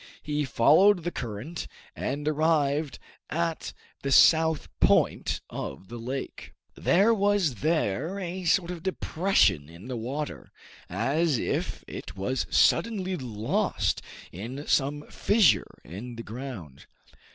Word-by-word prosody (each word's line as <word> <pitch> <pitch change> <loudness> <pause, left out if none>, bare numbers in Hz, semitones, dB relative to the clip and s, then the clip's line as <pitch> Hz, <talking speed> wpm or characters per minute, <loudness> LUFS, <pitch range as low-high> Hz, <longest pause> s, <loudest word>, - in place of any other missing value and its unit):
He 150 -1 -1
followed 165 - +5
the 175 - -2
current, 120 +6 -5 0.3
and 145 +3 -3
arrived 155 -2 +1 0.3
at 165 0 -2 0.3
the 140 - -2
south 160 +2 +5
point - - +2
of 70 +8 -7
the 120 0 -7
lake. 130 +4 -6 0.2
There 200 +6 +3
was 200 - +1
there 160 - 0
a 185 -1 -5
sort 170 +1 +2
of 175 -2 -6
depression 165 - +1
in 85 +9 -12
the 130 - -3
water, 135 +6 -5 0.4
as 155 0 +1
if - - -2
it - - -8
was 125 +8 -1
suddenly 190 -5 +2
lost 115 -7 -1 0.3
in 125 - -7
some 145 +1 +1
fissure 190 - +2
in 115 +9 -8
the 115 - -7
ground. 110 - -8
145 Hz, 120 wpm, -27 LUFS, 120-170 Hz, 0.4 s, followed